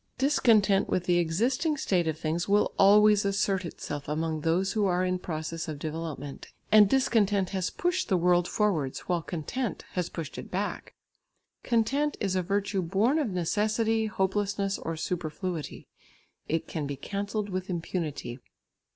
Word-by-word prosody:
Discontent 225 -8 +3
with 180 - 0
the 175 -1 +2
existing 245 - +1
state 180 -10 +1
of 160 -1 -1
things 165 +4 -2
will 205 +1 +3
always 210 +1 +6
assert 195 -1 0
itself 145 -3 -6
among 155 0 -1
those 175 +5 +1
who 210 -3 +2
are 180 0 +1
in 185 0 0
process 165 -1 -4
of 155 -2 -4
development, 155 -2 -6 0.2
and 210 -2 +7
discontent 205 -7 +2
has 190 -2 -1
pushed 355 +1 -1
the 190 - +3
world 175 0 +3
forwards, 165 -11 0
while 175 -2 -1
content 180 - -4
has 180 -2 -2
pushed 160 -5 -6
it - - -9
back. 200 +3 -4 0.7
Content 270 +6 +1
is 195 -3 -1
a 185 - +2
virtue 200 +1 -1
born 205 - +2
of 285 -7 0
necessity, 215 +5 0
hopelessness 200 0 -1
or 165 0 -4
superfluity; 170 0 -4 0.6
it 160 +1 -1
can 150 -4 -3
be 140 - -3
cancelled 205 +5 -3
with 185 0 -3
impunity. 165 -7 -4
190 Hz, 150 wpm, -28 LUFS, 165-210 Hz, 0.7 s, and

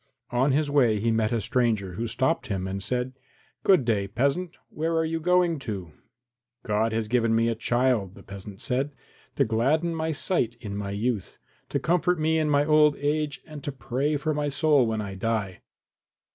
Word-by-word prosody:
On 130 +3 +2
his 150 +2 +2
way 125 -7 +3
he 115 +2 +1
met 110 -1 +1
a 120 - +1
stranger, 110 -5 0
who 115 +5 -3
stopped 130 +8 0
him 95 -3 -2
and 95 +1 -4
said, 125 +4 -2 0.5
"Good 185 -10 +4
day, 105 -4 +1
peasant; 140 - -1
where 165 +2 -2
are 160 - +2
you 165 0 -2
going 175 -1 +2
to?" 100 - -5 0.7
"God 110 +2 +1
has 110 -1 -1
given 115 -1 +2
me 115 +1 +3
a - - +1
child," 120 -4 0
the - - -13
peasant 100 0 -10
said, 135 +3 -1 0.4
"to 140 - +3
gladden 140 +10 +1
my 160 0 -1
sight 145 -6 +1
in 105 -4 -6
my 100 -1 -4
youth, 105 0 -2 0.3
to - - 0
comfort 175 +1 +1
me 160 +1 +2
in 155 -1 +1
my 145 0 +3
old 150 -1 +5
age 145 -1 -1
and 150 -3 -10
to 145 - -3
pray 135 +3 -1
for 155 +2 -1
my 145 0 -1
soul 145 -3 +3
when 110 -1 -1
I 100 -2 -5
die. 100 -2 -2
125 Hz, 190 wpm, -26 LUFS, 110-150 Hz, 0.7 s, old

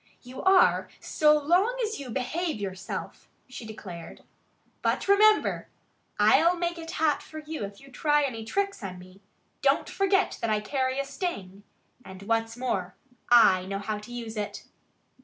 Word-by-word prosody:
"You 255 +1 -8
are 380 -1 +4
so 300 -1 +3
long 360 +11 +2
as 440 -5 -3
you 275 -3 -7
behave 305 +5 -2
yourself," 190 -2 -6 0.2
she 250 -3 -9
declared. 185 -6 -9 0.6
"But - - 0
remember! 425 +2 +4 0.5
I'll 275 +12 +5
make 345 0 -2
it 325 0 -8
hot 320 -3 +1
for 315 - -11
you 310 -4 -6
if 200 0 -11
you 275 0 -16
try 295 +2 +2
any 235 -5 -3
tricks 395 - -2
on 185 -2 -6
me! 185 +2 -15 0.4
Don't - - +2
forget 390 0 +1
that 230 - -1
I 215 -1 +2
carry 260 +4 -1
a 275 - -1
sting! 205 - -5 0.4
And 190 0 -11
what's 225 +2 -1
more, 195 -8 -2 0.3
I 210 -6 +6
know 195 0 -3
how 210 +1 -4
to 210 +4 -12
use 230 -2 -6
it." 205 -1 -4
255 Hz, 160 wpm, -27 LUFS, 210-325 Hz, 0.6 s, I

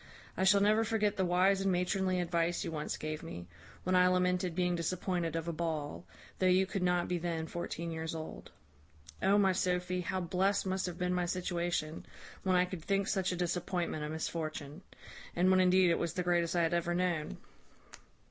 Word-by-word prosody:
I 190 - +1
shall 200 +1 +5
never 215 +2 +4
forget 215 -2 +1
the 190 - 0
wise 185 +2 +3
and 195 0 +2
matronly 185 +1 +1
advice 170 0 0
you - - -3
once 155 -1 -3
gave 155 0 -4
me, 90 - -7 0.4
when 185 0 +1
I 180 0 +6
lamented 180 -1 +1
being 180 0 +1
disappointed 170 -1 -2
of 165 0 -3
a 170 - -1
ball, 155 - -3 0.3
though 185 - +3
you 185 +1 +4
could 195 0 -3
not 180 -1 +1
be 180 -1 -1
then 165 -1 -2
fourteen 170 0 -4
years 160 0 -4
old. 160 -1 -7 0.7
O 200 +1 +4
my 195 -2 +4
Sophy, 180 0 0
how 185 +2 -2
blest 190 +3 +1
must 190 0 -1
have 175 -1 -6
been 180 0 0
my 180 -1 0
situation, 175 -3 -2 0.4
when 185 -1 +1
I 180 0 +4
could 180 -3 -7
think 195 +1 0
such 190 -3 0
a - - -2
disappointment 175 -2 -2
a 150 - -3
misfortune; 155 -1 -4 0.5
and 180 +2 +4
when 185 - +5
indeed 185 -1 +5
it - - +1
was 170 - -2
the 180 - -1
greatest 175 -1 +1
I 170 - +3
had 165 +1 +1
ever 175 0 0
known!" 175 -4 -1
180 Hz, 195 wpm, -32 LUFS, 170-185 Hz, 0.7 s, I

